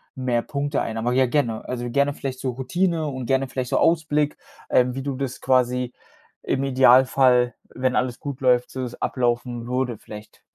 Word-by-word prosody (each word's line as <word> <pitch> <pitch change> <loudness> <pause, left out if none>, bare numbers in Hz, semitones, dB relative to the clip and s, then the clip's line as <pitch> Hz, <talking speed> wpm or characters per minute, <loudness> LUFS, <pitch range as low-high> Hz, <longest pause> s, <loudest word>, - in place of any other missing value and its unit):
mehr 125 -2 0
Punkte 145 +3 -2
ein. 110 - -3
Aber 120 +2 0
ja, 130 +1 +4
gerne. 120 -4 -1
Also, 120 -1 -4
gerne 140 +3 +1
vielleicht 130 -2 -5
so 130 - -2
Routine 160 +6 -1
und 130 -3 -5
gerne 135 +2 +1
vielleicht 130 -1 -3
so - - +2
Ausblick, 150 -3 +2 0.3
ähm, 125 0 +3
wie 135 - -4
du 140 -2 -3
das 130 -2 -4
quasi 125 -1 +1 0.5
im 135 - -1
Idealfall, 130 -1 +4 0.2
wenn 130 0 0
alles 125 0 -1
gut 140 -4 -5
läuft, 125 -1 +3
so 130 -1 -4
es 125 -1 -6
ablaufen 120 -1 -1
würde 125 -2 -1
vielleicht. 105 +1 -12
130 Hz, 180 wpm, -23 LUFS, 125-135 Hz, 0.5 s, ja